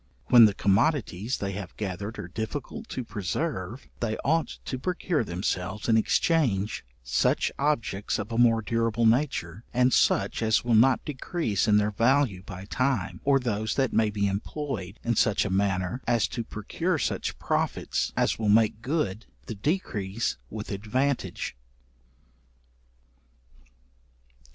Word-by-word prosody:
When 120 -2 +9
the 105 -3 +2
commodities 110 - +1
they 100 -1 -3
have 95 -1 -7
gathered 100 +2 -4
are - - -6
difficult 130 - -5
to 130 - -4
preserve, 105 - -4
they 110 -2 -1
ought 160 +4 +1
to 130 - -4
procure 175 -1 -1
themselves 95 +1 -3
in 115 - +4
exchange, 110 - +1 0.2
such - - +1
objects 115 -9 0
of 110 +2 -5
a 115 - -2
more 115 -2 +4
durable 115 +1 0
nature, 110 - +1
and 125 0 +4
such - - +2
as 110 0 +2
will 120 -1 +1
not 125 +4 +4
decrease 135 - -1
in 105 -1 +5
their 105 0 +2
value 115 -2 +2
by 95 -1 -9
time, 125 -4 -1
or 140 -1 +4
those 110 -4 -2
that 135 -2 +1
may 110 -1 +3
be 100 -1 -1
employed 100 0 -4
in 120 0 0
such 105 0 +2
a 100 - -2
manner, 95 +3 0
as 120 -1 +3
to 120 - -3
procure 160 - -2
such - - -2
profits - - -1
as - - +1
will 110 -2 0
make 110 0 +3
good 120 - -2 0.2
the - - -5
decrease 105 - -2
with 110 0 -6
advantage. 120 - -2
110 Hz, 140 wpm, -27 LUFS, 100-130 Hz, 0.2 s, When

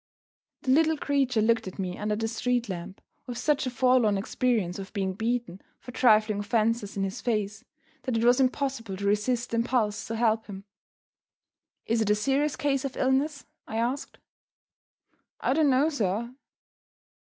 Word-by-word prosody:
The 260 - +1
little 320 +3 +4
creature 270 -6 +1
looked 230 -2 +2
at 185 - -8
me 185 -2 -3
under 210 +1 -2
the 225 +1 -2
street 240 +1 -1
lamp 185 +1 -7 0.3
with 245 -2 -5
such 290 -1 +1
a - - 0
forlorn 245 -4 +3
experience 205 -3 -1
of 190 -1 -8
being 190 -3 -1
beaten 225 -3 -2 0.2
for 250 - -10
trifling 215 -4 +3
offenses 220 -1 0
in 195 - 0
his 195 0 -4
face, 210 -3 -2 0.4
that 255 -3 -1
it 225 - 0
was 245 +2 +5
impossible 255 -6 -1
to 200 - -4
resist 230 +4 0
the 230 - 0
impulse 225 -3 0
to 225 - -3
help 225 -1 +1
him. 195 -2 -8 1.2
"Is 230 0 +1
it 215 - 0
a 210 - +5
serious 275 +6 +1
case 275 -2 0
of 275 -2 -5
illness?" 275 +3 0 0.2
I 220 - -4
asked. 245 +5 -2 1.2
"I - - +1
don't 305 0 +3
know, 270 +4 +3
sir." 235 -3 -2
230 Hz, 165 wpm, -27 LUFS, 210-255 Hz, 1.2 s, was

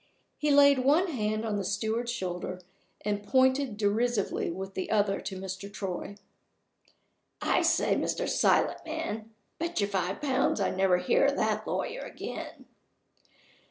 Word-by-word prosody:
He 300 - +1
laid 280 -1 +6
one 300 +8 +3
hand 215 -4 -1
on 210 -2 -1
the 200 - -2
steward's 220 +4 -1
shoulder, 185 -4 -4 0.5
and 205 -1 -1
pointed 260 -1 +2
derisively 215 +1 0
with 190 +3 -5
the 190 - -4
other 205 -2 +1
to 190 - -5
Mr. 190 +1 -6
Troy. 195 -1 -5 1.2
"I - - +2
say, - - +2
Mr. - - -1
Silent - - +2
man! 315 -10 -4 0.3
Bet 340 -2 -2
you 200 - +3
five 190 -2 -2
pounds 270 -5 +1
I 195 - +1
never 190 -1 +3
hear 475 - +2
of - - +1
that - - 0
lawyer - - -2
again!" - - -7
215 Hz, 145 wpm, -29 LUFS, 195-260 Hz, 1.2 s, laid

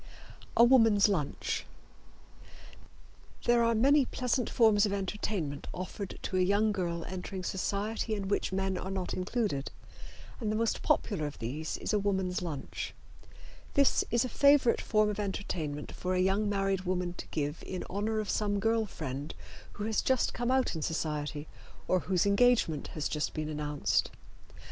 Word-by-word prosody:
A 235 - +8
Woman's 225 -5 +6
Lunch. 160 -9 -1 1.8
There 240 0 +4
are 230 0 +3
many 275 +5 +5
pleasant 250 -1 -1
forms 220 -3 +4
of 200 - -2
entertainment 190 -6 -3
offered 185 +2 -5
to 185 - -1
a - - +3
young 205 +4 +3
girl 170 -4 -2
entering 185 +1 -5
society 210 +4 -2
in 200 -2 -4
which 200 - 0
men 190 -1 -1
are 190 - -5
not 190 -2 -3
included, 185 - -1 0.7
and 215 -4 -1
the - - 0
most 225 +1 0
popular 165 -9 +1
of 145 - -8
these 145 +8 -4
is - - -3
a 210 - +3
woman's 190 -3 0
lunch. 155 -6 -5 0.8
This 280 -1 +4
is 235 +1 +2
a - - -1
favorite 280 -2 +4
form 215 -1 +2
of 210 - -5
entertainment 170 -7 -3
for 185 0 -2
a - - +1
young 195 +3 +2
married 195 -2 0
woman 180 -1 -1
to - - -6
give 150 +1 -3
in 185 - -5
honor 215 +3 -1
of 215 - -3
some 205 -1 0
girl 225 +1 +1
friend 145 -4 -5 0.4
who 205 - -5
has 220 0 +1
just 260 -2 +1
come 240 0 -2
out 260 0 +2
in 160 - -4
society 150 -1 -2 0.4
or 185 - +3
whose 180 +1 +1
engagement 200 -7 +3
has 155 - -3
just 150 -1 -2
been 155 -1 -2
announced. 150 -1 0
195 Hz, 165 wpm, -31 LUFS, 170-220 Hz, 1.8 s, A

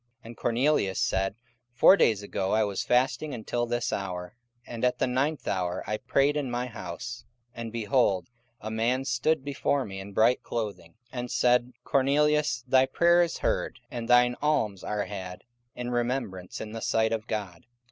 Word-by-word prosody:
44:010:030 120 - -47
And 115 +1 -11
Cornelius 120 -5 +1
said, 95 +1 0 0.4
Four 185 - +8
days 110 - +2
ago 95 -1 -2
I 110 0 +4
was 100 +2 -2
fasting 130 +4 +1
until 120 +1 -2
this 120 0 -1
hour; 90 -1 -4 0.3
and 115 0 -7
at 125 0 +2
the - - +1
ninth 135 +5 -1
hour 90 -2 -1
I 105 - -2
prayed 140 +6 +2
in 145 -3 -1
my 120 +1 -2
house, 115 +2 -7 0.3
and, 115 -1 -6
behold, 110 -5 +1 0.3
a 110 - -6
man 120 +4 0
stood 135 +4 +1
before 140 -1 0
me 95 -1 -7
in 95 +1 -8
bright 115 +5 +3
clothing, 100 -8 -5 0.2
44:010:031 125 - -4
And 120 0 -4
said, 125 0 +2
Cornelius, 145 -1 +2
thy 130 +1 +4
prayer 170 +5 +4
is 170 -1 0
heard, - - -1
and 115 -1 -5
thine 125 0 +5
alms 115 -10 0
are 105 -1 -2
had 95 -3 -7 0.3
in 125 0 -4
remembrance 120 -7 -2
in 110 - -6
the 115 0 -6
sight 110 0 +1
of 110 -1 -2
God. 100 -5 -5
120 Hz, 180 wpm, -27 LUFS, 105-130 Hz, 0.4 s, Four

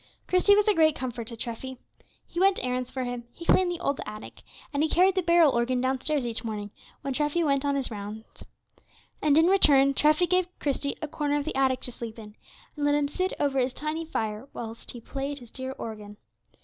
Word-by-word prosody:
Christie 370 +3 +5
was 415 0 +3
a 425 - +5
great 315 -4 +4
comfort 245 -3 -5
to 230 - -5
Treffy. 245 +3 -5 0.5
He 345 - -5
went 390 +1 +4
errands 250 0 -2
for 260 - -3
him, 245 -1 -4
he 335 - -10
cleaned 365 +1 +4
the 345 - -4
old 285 -5 -1
attic, 215 0 -9 0.3
and 285 - +1
he 315 - +2
carried 370 +4 +4
the 375 - +1
barrel 340 -3 +5
organ 245 +1 +1
downstairs 265 +2 0
each 230 0 -3
morning 210 -2 -4 0.3
when 275 0 -3
Treffy 295 +4 +1
went 275 -2 +2
on 285 -1 +1
his 270 -3 -2
rounds. 210 +1 -8 0.8
And, 295 -1 +4
in 325 - +6
return, 280 -7 +5
Treffy 305 +5 +4
gave 365 +1 +2
Christie 280 0 -1
a - - -1
corner 295 -1 -1
of 290 - -2
the 315 - -3
attic 265 -1 +2
to 250 - -3
sleep 230 -2 -7
in 210 -2 -11 0.4
and 295 - -4
let 290 0 +3
him 290 -1 +1
sit 370 +6 -2
over 275 -2 +1
his 250 0 0
tiny 305 +3 -3
fire 220 -5 -4
whilst 230 0 -7
he 240 - -7
played 275 +4 -4
his 240 -4 -12
dear 260 0 -5
old - - -26
organ. 210 -2 -7
275 Hz, 220 wpm, -27 LUFS, 240-315 Hz, 0.8 s, in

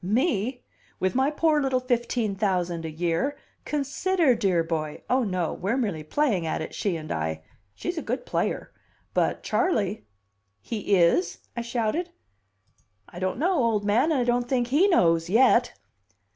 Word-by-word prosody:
"Me? 245 - 0 0.4
With 185 - 0
my 265 +2 +2
poor 305 0 +2
little 265 -2 +1
fifteen 240 -3 -1
thousand 180 -4 -1
a - - -3
year? 170 - -1 0.3
Consider, 300 +2 +1
dear 195 -7 +1
boy! 155 -2 -4
Oh, 255 0 +3
no, 185 -6 -1
we're 200 +7 -1
merely 200 -11 -1
playing 190 - 0
at - - -1
it, 155 - -6
she 195 -4 -1
and 155 -1 -7
I. 80 0 -3 0.3
She's 350 -1 -3
a - - -5
good - - -3
player. - - -2 0.4
But - - 0
Charley 220 - 0 0.3
" 100 0 -48
"He 205 -3 +1
is?" 175 0 +3 0.2
I 235 - -2
shouted. 235 +9 -1 1.0
"I 175 - -9
don't 185 +3 -1
know, 350 +8 +2
old 230 - +1
man, 235 +10 +3
and 295 - +2
I - - +2
don't 245 0 0
think 245 -2 +1
he 310 +9 +4
knows 165 - +3
yet." 240 +3 +4
220 Hz, 165 wpm, -26 LUFS, 175-265 Hz, 1.0 s, he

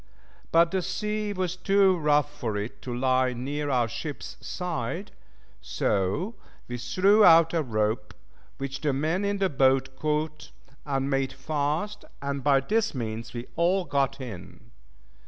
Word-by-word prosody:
But 165 0 +5
the 190 -1 0
sea 210 +3 -2
was 185 -2 -2
too 195 0 +4
rough 150 -2 +2
for 110 -7 -3
it 105 +3 -5
to 125 - -6
lie 130 0 +2
near 145 +4 -3
our 125 -4 +2
ship's 145 +6 -6
side, 175 - -4 0.5
so 95 - -1 0.3
we 120 0 -5
threw 195 - +4
out 165 -2 +7
a 165 - +2
rope, 110 -4 -1 0.4
which 135 0 -5
the 145 -3 +1
men 160 +8 0
in 200 0 0
the 195 -1 +2
boat 135 -3 +2
caught, 150 +1 -2 0.4
and 135 -1 0
made 135 -1 0
fast, 155 +7 -2 0.2
and 140 -1 -3
by 140 -2 +4
this 220 +4 0
means 115 -1 -5
we 120 +1 -4
all 180 +2 +2
got 140 -2 0
in. 100 -4 -9
145 Hz, 150 wpm, -27 LUFS, 125-180 Hz, 0.5 s, out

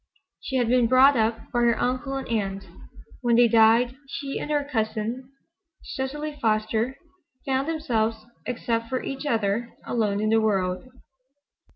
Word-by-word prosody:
She 265 - -5
had 245 -3 +2
been 245 0 +3
brought 260 +3 +6
up 225 -1 -1
by 240 - +2
her 235 -1 +3
uncle 255 +2 -1
and 270 - -4
aunt. 195 -4 -2 0.6
When 240 -2 +2
they 240 0 +6
died 230 +2 +4
she 275 0 -4
and - - -5
her 295 -1 +1
cousin, 230 0 -3 0.5
Cecily 295 +3 -4
Foster, 220 +3 0 0.5
found 270 +1 0
themselves, 225 -9 -1 0.2
except 230 -1 -2
for 255 - -2
each 275 +2 -5
other, 225 -1 0 0.2
alone 210 -4 0
in 215 +1 0
the 225 0 +4
world. 195 +2 -1
235 Hz, 150 wpm, -25 LUFS, 220-265 Hz, 0.6 s, brought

